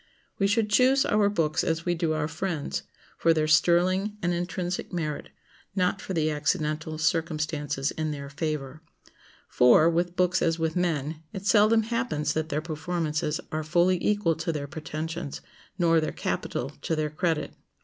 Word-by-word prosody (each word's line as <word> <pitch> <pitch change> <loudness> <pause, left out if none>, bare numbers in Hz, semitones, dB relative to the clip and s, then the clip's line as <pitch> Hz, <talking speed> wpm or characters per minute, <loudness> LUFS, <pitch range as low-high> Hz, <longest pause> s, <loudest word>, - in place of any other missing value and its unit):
We 195 - +3
should 210 +1 +1
choose 260 +4 +4
our 210 -1 +3
books 160 -5 0
as 165 0 -1
we 175 - +2
do 165 -2 0
our 150 -1 -1
friends, 160 - -3 0.4
for 165 -1 +4
their 155 -1 +1
sterling 185 +6 +3
and 175 0 +1
intrinsic 175 +1 -3
merit, 155 -5 -3 0.5
not 185 +1 +1
for 190 - -5
the 155 -1 +1
accidental 155 +1 -1
circumstances 155 -3 -1
in 155 -1 -3
their 140 -2 -5
favor. 150 -1 -4 0.7
For, 125 +6 +5
with 175 +1 0
books 180 0 +2
as 165 0 +2
with 160 -1 -1
men, 160 -3 -1
it 195 0 -6
seldom 215 +2 +5
happens 220 - -1
that 160 0 -2
their 150 0 -1
performances 155 -1 -2
are 155 - -1
fully 175 +3 +2
equal 205 -5 +2
to 165 +1 -2
their 150 -3 -3
pretensions, 155 +1 -5 0.4
nor 165 -3 +4
their 155 - -2
capital 130 +3 -3
to 165 - -1
their 155 -1 -1
credit. 160 0 -1
160 Hz, 160 wpm, -27 LUFS, 155-180 Hz, 0.7 s, For